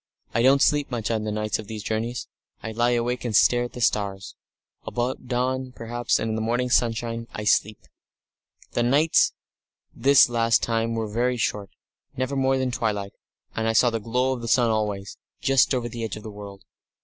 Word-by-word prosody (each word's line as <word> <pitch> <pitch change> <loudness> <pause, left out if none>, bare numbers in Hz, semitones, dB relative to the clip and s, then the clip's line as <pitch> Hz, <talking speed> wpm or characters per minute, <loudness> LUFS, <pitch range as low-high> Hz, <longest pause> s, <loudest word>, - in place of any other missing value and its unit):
I 115 - +2
don't 135 +3 +5
sleep 145 -2 +2
much 115 -3 -2
at 110 -1 0
nights 105 0 -2
on 110 - -7
these 105 0 -7
journeys; 115 +3 -3 0.4
I 110 - -4
lie 120 +2 +1
awake 120 +1 -1
and 115 -4 -2
stare 120 +3 +4
at 120 - -9
the 125 - -7
stars. 100 -3 -1 0.5
About 125 +1 -3
dawn, 130 +1 -1
perhaps, 120 +1 -1
and 115 - -2
in - - -1
the 110 - -2
morning 120 +3 -1
sunshine, 115 -1 0
I 105 - -4
sleep! 105 0 +2 0.9
The - - 0
nights 145 +7 +3 0.6
this 135 +3 +5
last 115 -2 +2
time 115 0 0
were 110 -1 -2
very 120 +4 0
short, 105 -3 -2 0.5
never 130 +2 -2
more 135 0 +2
than 130 -1 -1
twilight, 105 -4 -2 0.4
and 110 0 -1
I 115 - +1
saw 120 +2 +4
the 115 - -2
glow 125 +4 0
of 125 - -6
the 115 - -5
sun 120 0 +3
always, 105 -2 -2 0.2
just 135 -3 +3
over 125 -3 0
the 115 0 -6
edge 110 -2 -4
of 105 - -10
the 110 - -7
world. 100 -2 -10
115 Hz, 195 wpm, -24 LUFS, 110-125 Hz, 0.9 s, don't